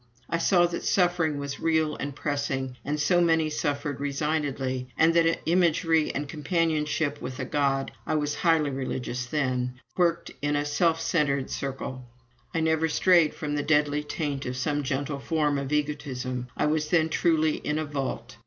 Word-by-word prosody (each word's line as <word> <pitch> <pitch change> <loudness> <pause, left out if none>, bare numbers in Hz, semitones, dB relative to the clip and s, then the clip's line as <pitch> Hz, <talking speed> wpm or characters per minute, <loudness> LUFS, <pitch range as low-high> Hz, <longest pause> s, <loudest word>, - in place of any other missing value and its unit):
I 165 - -1
saw 175 0 +4
that 170 0 -3
suffering 175 -5 +2
was 140 0 -5
real 160 -2 +1
and 140 -1 -5
pressing, 140 -3 -2
and 150 +1 -2
so 175 +4 +3
many 160 -2 +3
suffered 145 -2 -2
resignedly; 140 -3 -1
and 165 +1 +5
that 165 0 +3
imagery 165 -2 +3
and 145 - -1
my - - -10
companionship 150 -2 0
with 130 - -6
a 130 - -2
God 135 -1 0 0.2
(I 155 - +1
was 150 -1 0
highly 160 -4 +2
"religious" 125 -2 -3
then) 125 -3 -1 0.2
worked 170 -2 +1
in 145 0 0
a 145 0 0
self 160 +2 +2
centred 150 -5 0
circle. 135 -1 -4 0.5
I 165 - -1
never 160 0 +2
strayed 170 -1 +4
from 150 -3 -4
the 145 - 0
deadly 150 0 +2
taint 145 -2 -3
of 125 0 -3
some 145 +3 0
gentle 140 +1 -2
form 150 -1 0
of 140 0 -5
egotism. 135 -4 -2
I - - +2
was 150 0 +1
then 160 -1 +3
truly 160 -2 +2
in 150 - -2
a 155 - -1
"vault." 130 -4 -4
150 Hz, 170 wpm, -27 LUFS, 140-160 Hz, 0.5 s, and